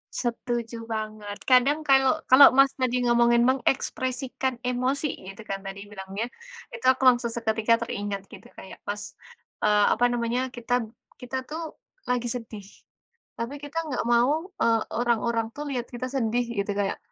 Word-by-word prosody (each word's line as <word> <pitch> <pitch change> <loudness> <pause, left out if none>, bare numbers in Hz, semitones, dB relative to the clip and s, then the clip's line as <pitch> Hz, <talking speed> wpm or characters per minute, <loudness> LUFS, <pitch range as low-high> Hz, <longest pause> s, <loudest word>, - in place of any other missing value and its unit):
Setuju 235 -1 -3
banget, 215 -1 -5
kadang 275 +4 +4
kalau 270 +2 +4
kalau, 270 +2 +9
Mas 275 +1 +4
tadi, 255 -2 0
ngomongin 240 0 +4
mengekspresikan 260 0 -1
emosi 255 +4 -1 0.2
gitu, 195 - -12
kan, 195 0 -4
tadi 195 +1 -8
bilangnya. 200 +2 -5 0.4
Itu, - - -9
aku 260 0 -3
langsung 240 -2 +4
seketika 230 0 +1
teringat 205 -3 -4
gitu, - - -13
kayak 190 - -12
pas, 205 0 -5 0.5
eee, 210 -1 +4
apa 245 - +2
namanya, 245 +2 -1
kitab 240 -2 -2 0.2
kita 255 0 -5
tuh, 320 0 -7 0.3
lagi 245 -1 0
sedih. 225 -4 -6 0.7
Tapi, 235 +5 -3
kita 290 +2 -7
nggak 265 -5 -2
mau, 295 +10 +2
eee, 225 -1 +3 0.2
orang-orang 235 -1 +1
tuh, 295 - -5
lihat 245 -3 -3
kita 245 +1 -5
sedih, 240 -1 +1 0.2
gitu, 200 +1 -1
kayak, 195 -1 -1
240 Hz, 145 wpm, -26 LUFS, 220-260 Hz, 0.7 s, kalau